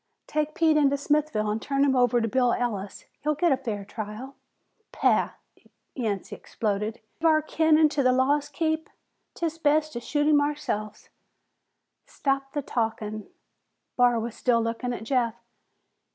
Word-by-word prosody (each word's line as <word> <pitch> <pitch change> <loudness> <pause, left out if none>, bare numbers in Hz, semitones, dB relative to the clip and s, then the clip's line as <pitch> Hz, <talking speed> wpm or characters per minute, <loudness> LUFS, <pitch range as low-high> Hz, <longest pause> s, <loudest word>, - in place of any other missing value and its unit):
"Take 305 0 -2
Pete 320 -2 +3
into 280 -1 +3
Smithville 285 -7 0
and 215 +1 -2
turn 275 0 +1
him 270 -2 +2
over 245 -1 +3
to 225 - 0
Bill 250 +1 +2
Ellis. 205 -5 -3 0.2
He'll 300 +1 0
get 335 +3 +2
a 270 - +3
fair 220 -7 -4
trial." 215 +5 -7 0.6
"Pah!" - - +2 0.6
Yancey 210 -4 -3
exploded. 210 +1 -3 0.2
"Give 325 - +2
our 310 -1 +3
kin 315 0 +3
into 305 -2 +3
the 255 -1 +4
law's 280 +3 +2
keep? 315 0 -1 0.5
'Tis 330 -1 -3
best 305 0 +2
to 235 - -3
shoot 290 +4 -1
him 300 -1 +5
ourselves!" 285 -8 -3 1.0
"Stop 275 -1 -2
the 290 - -2
talkin'." 220 -3 -3 0.7
Barr 245 -2 +4
was 230 0 -4
still 240 -1 +2
looking 230 +2 -2
at 235 - -5
Jeff. 235 -2 0
260 Hz, 150 wpm, -26 LUFS, 225-300 Hz, 1.0 s, him